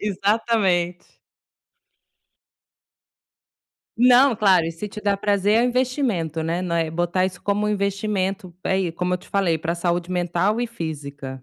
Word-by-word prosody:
Exatamente. 195 -3 0 2.9
Não, 250 +2 +6
claro, 190 -5 +4
e 165 - -2
se 185 +6 -6
te 210 - -9
dá 200 -1 +1
prazer, 205 0 +1
é 235 - +3
investimento, 245 - -1
né, 170 +3 -2
não 170 -2 -1
é 165 -1 0
botar 175 +2 0
isso 180 -1 -8
como 205 +1 0
um - - 0
investimento. 200 -2 -2
É 190 - +1
e, 175 -3 -1
como 180 +2 -1
eu - - -3
te - - -18
falei, 185 -5 +1
para 165 +2 -2
saúde 175 0 -1
mental 180 +5 0
e 245 - 0
física. 145 - -7
185 Hz, 150 wpm, -22 LUFS, 170-210 Hz, 2.9 s, Não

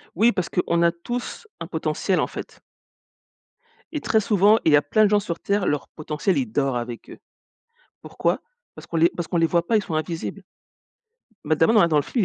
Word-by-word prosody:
Oui, 225 +7 +4
parce 185 -6 -3
qu'on 170 -1 0
a 170 - +4
tous 240 - -6
un - - -6
potentiel, - - -1
en - - +1
fait - - -9 1.4
et 300 - -2
très 220 - +2
souvent, 210 0 +4
il 155 - +4
y - - +9
a 145 - +5
plein 215 +9 +3
de - - +2
gens 210 0 +4
sur 170 -3 -5
Terre, 200 -1 0
leur 145 - -1
potentiel, 155 +4 -2
il 130 -3 0
dort 135 0 0
avec 120 -1 -7
eux. - - -12 0.8
Pourquoi? - - -1 0.4
Parce - - -11
qu'on 165 - -3
les 165 +1 +5
parce 175 -3 -6
qu'on 175 - -1
les 165 0 +3
voit 170 0 +1
pas. 230 - +2
Ils 210 - -1
sont 165 - -4
invisibles 165 +1 -4 1.0
mais 155 - +1
d'abord, 165 +9 +3
là, 170 - +5
dans 155 -2 +2
le - - +4
film, 225 - -1
170 Hz, 215 wpm, -23 LUFS, 155-205 Hz, 1.4 s, y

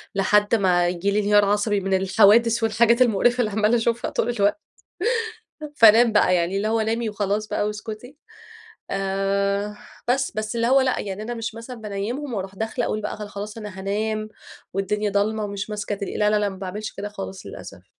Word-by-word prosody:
لحد 205 +3 +3
ما 180 -4 +2
ييجي 180 +3 -1
لي 205 - +1
انهيار 205 0 +4
عصبي 205 +1 +1
من 195 0 -2
الحوادث 215 +5 +4
والحاجات 235 +2 +3
المقرفة 240 +1 +3
اللي 220 -3 +1
عمّالة 215 +3 +2
أشوفها 235 +1 -1
طول - - -1
الوقت 205 +2 +1 1.2
فانام 230 -1 +7
بقى، 205 -3 +4
يعني 175 +2 0
اللي 205 +2 -1
هو 225 0 +1
نامي 225 +1 -1
وخلاص 210 0 -2
بقى 205 - -1
واسكتي، 220 +5 -7 0.7
آآ 200 +1 -1 0.3
بس. 270 +2 +1
بس 215 +2 -3
اللي 230 - +1
هو 265 +3 +5
لأ 260 -1 +1
يعني 200 0 -5
أنا 240 +3 -4
مش 225 -1 -5
مثلًا 230 +2 -8
بانيمهم 225 +6 -4
وأروح 195 -1 -5
داخلة 220 +4 -2
أقول 215 - -2
بقى 210 - -4
خ 210 - -8
خلاص 205 +2 -7
أنا 210 -3 -8
هانام 215 +2 -2 0.4
والدنيا 205 +2 -1
ضلمة 210 +2 0
ومش 200 +1 -5
ماسكة 210 0 -3
تلي 200 0 -5
لا 210 0 +2
لا 210 - +3
لأ 205 -1 0
ما 190 - -7
باعملش 200 +3 -6
كده 205 +1 -6
خالص 195 -2 -8
للأسف. - - -10
210 Hz, 185 wpm, -23 LUFS, 200-225 Hz, 1.2 s, فانام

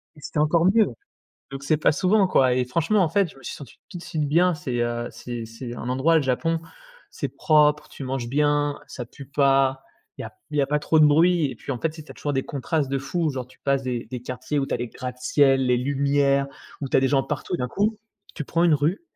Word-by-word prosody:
Et 150 - -16
c'était 150 - -4
encore 165 +3 +3
mieux! 215 +2 +4 0.6
Donc, 135 0 -7
c'est 155 +2 +2
pas 150 - +3
souvent, 190 +3 +2
quoi 130 -7 +3
et 125 0 +1
franchement, 170 - +1
en 170 - +2
fait, 190 +2 +1
je - - -16
me 135 - -16
suis - - -6
senti 140 - -12
tout 180 - -8
de - - -11
suite 155 -4 -2
bien. 175 +4 +3
C'est, 130 -5 -4
heu, 120 0 -2
c'est 120 -2 -7
c'est 120 +2 -8
un 120 - -6
endroit, 135 +6 +2
le 160 - +3
Japon, 160 +5 0 0.5
c'est - - -4
propre, 150 -1 +2
tu 140 - -9
manges 130 -2 -3
bien, 145 +1 +1
ça 125 - -7
pue 140 +4 -12
pas, 135 -1 +2 0.3
il - - -11
y - - -6
a - - -9 0.2
il 150 - -2
y 140 - +4
a - - +1
pas 150 +2 +1
trop 155 +1 +2
de 150 - +8
bruit 165 +2 +4
et 125 - -9
puis, 140 - -5
en 125 - -4
fait, 160 - +1
ici, 155 0 -10
tu - - -16
as - - -21
toujours 145 - -3
des 135 -1 -1
contrastes 145 +1 -2
de 135 0 -1
fou. 160 +4 -1
Genre 130 -3 -5
tu 130 - -21
passes 140 -1 +1
des 125 -2 -3
des 125 -2 -7
quartiers 130 +4 -3
où 135 - -1
tu - - -2
as - - +1
les 120 0 -4
gratte-ciels, 130 +2 +1
les 125 0 +3
lumières 140 +1 +1 0.3
ou 140 - -3
tu - - +2
as - - +5
des 135 - +2
gens 135 0 +2
partout. 150 +4 -3
D'un 125 - -3
coup, 210 - 0 0.4
tu 150 - -4
prends 165 +4 0
une 170 -3 +5
rue, 150 - 0
140 Hz, 265 wpm, -24 LUFS, 130-155 Hz, 0.6 s, de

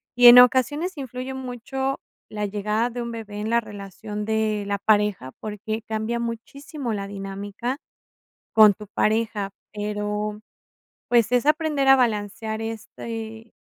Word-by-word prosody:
y 245 0 +8
en 240 +1 +12
ocasiones 290 +8 +3
influye 260 -1 -5
mucho 265 +1 -3 0.3
la 210 -1 -3
llegada 210 +3 -1
de 245 +1 -4
un 235 - -5
bebé 220 -3 -7
en 215 - -3
la 235 - +3
relación 210 0 -7
de 220 -1 0
la 200 0 -1
pareja, 210 -11 +1
porque 215 +1 -5
cambia 220 +2 -2
muchísimo 240 +4 -5
la 200 -1 -3
dinámica 200 +5 -5 0.8
con 215 -2 +7
tu 210 +2 -11
pareja, 215 -1 0 0.2
pero, 210 0 -3 0.7
pues, 235 -2 +4
es 250 +1 +2
aprender 300 -2 +2
a 270 - +9
balancear 220 -1 -1
este 225 0 -7
220 Hz, 135 wpm, -24 LUFS, 210-245 Hz, 0.8 s, en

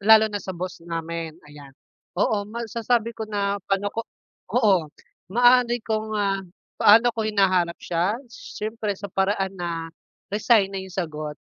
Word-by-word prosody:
lalo 220 +2 +7
na 205 - -2
sa 190 -2 -6
boss 180 0 -5
namin, 165 -1 -5
ayan. 145 -1 -13 0.5
Oo, 205 +1 +1
masasabi 230 +1 -1
ko 220 -1 -6
na 200 -1 -1
pa'no 200 +1 0
ko 230 - -2 0.5
Oo, 205 -8 +4 0.5
maaari 245 +1 +5
kong, 220 -1 -2
ah, 195 -1 +1 0.4
paano 225 +4 +7
ko 220 - -1
hinahanap 185 -5 +2
siya? 175 +5 0
Siyempre 215 -2 -5
sa 200 - -6
paraan 195 0 0
na, 170 -2 -4 0.4
resign 210 -1 +4
na - - -4
'yong 190 -1 -10
sagot. 155 -5 -4
200 Hz, 145 wpm, -24 LUFS, 175-220 Hz, 0.5 s, lalo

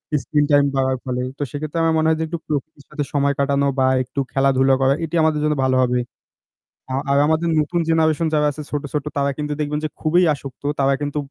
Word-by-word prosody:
Screen 145 +2 +1
time 145 0 +5
বাড়ার 130 -1 +1
ফলে। 125 -1 -2 0.2
তো - - -2
সেক্ষেত্রে 155 +3 -4
আমার 165 0 +2
মনে 160 0 +2
হয় 160 - +2
যে - - 0
একটু 170 +2 -4
প্রকৃতির 145 -1 -4
সাথে 150 -1 -3
সময় 140 -1 +2
কাটানো 140 0 +2
বা 130 - +4 0.2
একটু 130 +2 -6
খেলাধুলা 135 0 +3
করা, 135 +1 +4
এটি 160 - -5
আমাদের 155 -1 +2
জন্য 150 0 +1
ভালো 130 0 +2
হবে। 125 0 +1 0.9
আ - - -2 0.2
আর 140 - +3
আমাদের 160 +2 +1
নতুন 155 +3 0
জেনারেশন 160 0 +2
যারা 150 -1 +3
আছে 150 - -8
ছোট 145 -1 -2
ছোট, 150 -1 -2
তারা 140 0 +1
কিন্তু 150 -1 -3
দেখবেন 150 0 -1
যে - - -2
খুবই 165 +3 +3
আসক্ত। 140 -2 -9 0.2
তারা 135 0 +3
কিন্তু 145 0 -3
145 Hz, 220 wpm, -21 LUFS, 135-155 Hz, 0.9 s, time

